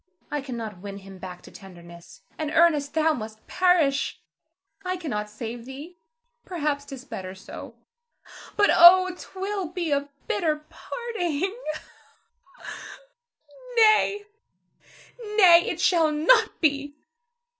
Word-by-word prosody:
I 295 - -2
cannot 230 -7 -6
win 200 +1 -8
him 195 -1 -12
back 180 -1 -9
to - - -14
tenderness, 175 -2 -14
and 310 -1 -3
Ernest, 310 -3 +2
thou 320 0 +3
must 220 -4 -8
perish. 340 -7 +1 0.6
I 370 0 -2
cannot 210 -12 -4
save 230 +2 -7
thee, 295 +7 -10 0.4
perhaps 295 -5 -2
'tis 270 -2 -10
better 190 -7 -7
so; 190 - -10 0.8
but 410 -1 +5
oh, 365 +2 +8
'twill 385 0 -5
be 340 -1 -4
a 285 0 0 0.2
bitter 300 +6 -1
parting! 385 -11 -4
[Weeps.] 380 -5 -3 2.0
Nay, 430 -2 +4 1.1
nay, 345 -5 +7
it - - -3
shall 330 -4 +3
not 375 +10 +3
be! 285 -2 0
300 Hz, 115 wpm, -25 LUFS, 230-360 Hz, 2.0 s, oh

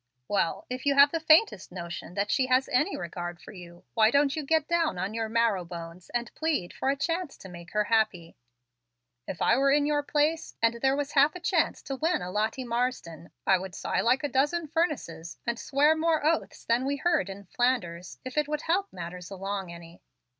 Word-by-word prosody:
"Well, 200 -4 0
if 255 +2 -5
you 280 - +3
have 280 +1 +7
the 330 - -1
faintest 315 - +4
notion 175 0 -7
that 205 +1 0
she 260 -1 +2
has 255 +1 +3
any 295 +10 +1
regard 175 0 -5
for - - -12
you, 175 -2 -12
why 220 -1 +5
don't 280 +2 +3
you 310 - -2
get 315 +1 +1
down 335 - +1
on 190 +4 -3
your 225 -1 -2
marrow 225 -5 +2
bones 170 0 -9
and 240 -1 -3
plead 315 - -1
for 265 - -1
a 275 - +2
chance 330 +2 -2
to - - -11
make 170 -1 -11
her 210 0 +2
happy? 210 -6 0 0.9
If 175 - -3
I 235 - +4
were 275 +1 +3
in 290 +1 +3
your 295 0 +1
place, 300 +2 0
and 230 0 +1
there 270 0 +3
was 290 0 -2
half 290 +3 +4
a - - -6
chance 355 - 0
to 270 - -4
win 320 - 0
a 180 - -5
Lottie 220 +6 -1
Marsden, 235 -9 -3 0.2
I 190 -1 +4
would 185 -2 -7
sigh - - -1
like 255 +4 +2
a - - +1
dozen 295 +6 +1
furnaces, 280 - -2
and 235 0 -2
swear 295 +3 +3
more 315 -2 +1
oaths 320 +1 0
than 235 +2 +2
were 280 +1 -1
heard 315 - +1
in 195 +1 -8
Flanders, 190 -6 -1
if 255 +3 -1
it 300 - 0
would 300 0 -2
help 385 +4 0
matters 175 -1 -7
along 195 -1 -4
any." 170 0 -12
245 Hz, 210 wpm, -28 LUFS, 185-295 Hz, 0.9 s, have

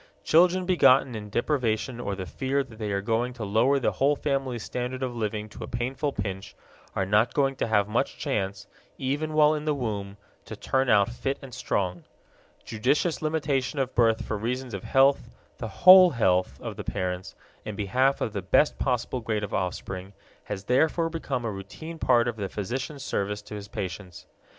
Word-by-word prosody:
Children 180 +3 +4
begotten 135 -8 +4
in 105 -2 -6
deprivation 120 0 -1
or 100 -4 -3
the 95 -1 -5
fear 135 +8 -1
that 115 -4 -15
they 105 -2 -3
are 100 0 -1
going 115 +3 0
to 120 -3 -7
lower 115 +7 +3
the 135 - +1
whole 140 +2 +2
family's 135 -6 -2
standard 125 +1 -4
of 125 -2 -3
living 110 -1 -3
to - - -9
a - - -6
painful 130 +5 -2
pinch 100 -2 -5 0.4
are 95 - 0
not 105 +4 +2
going 135 -2 +2
to - - -1
have 105 -3 +2
much 115 +5 -1
chance, 100 -7 -2 0.3
even 145 +4 -2
while 155 0 +5
in 150 0 -3
the 150 -1 +1
womb, 105 -6 -4 0.3
to - - -7
turn 130 -1 0
out 100 -2 +4
fit 135 +3 -3
and 130 -2 -10
strong. 90 -6 -2 0.6
Judicious 140 +9 0
limitation 150 -3 -1
of 130 -1 -1
birth 115 -2 +2
for 105 - -3
reasons 125 +2 -3
of 100 - -5
health, 135 +1 +3 0.3
the - - -4
whole 185 - +8
health 95 - +1
of - - -6
the - - -5
parents, 90 0 -4 0.3
in 105 - -6
behalf 130 +7 +1
of 110 - -2
the 100 - -2
best 95 +11 +2
possible 125 -1 -1
grade 110 -2 -2
of 100 - -5
offspring 95 +1 -4 0.3
has 95 -2 -5
therefore 160 - +2
become 135 -7 -3
a 110 - -1
routine 130 +12 -8
part 120 -4 +3
of 120 -2 -3
the 100 -2 -3
physician's 130 +7 -4
service 105 -4 -2
to 105 - -10
his 105 -1 -7
patients. 95 -2 -6
120 Hz, 190 wpm, -26 LUFS, 105-135 Hz, 0.6 s, whole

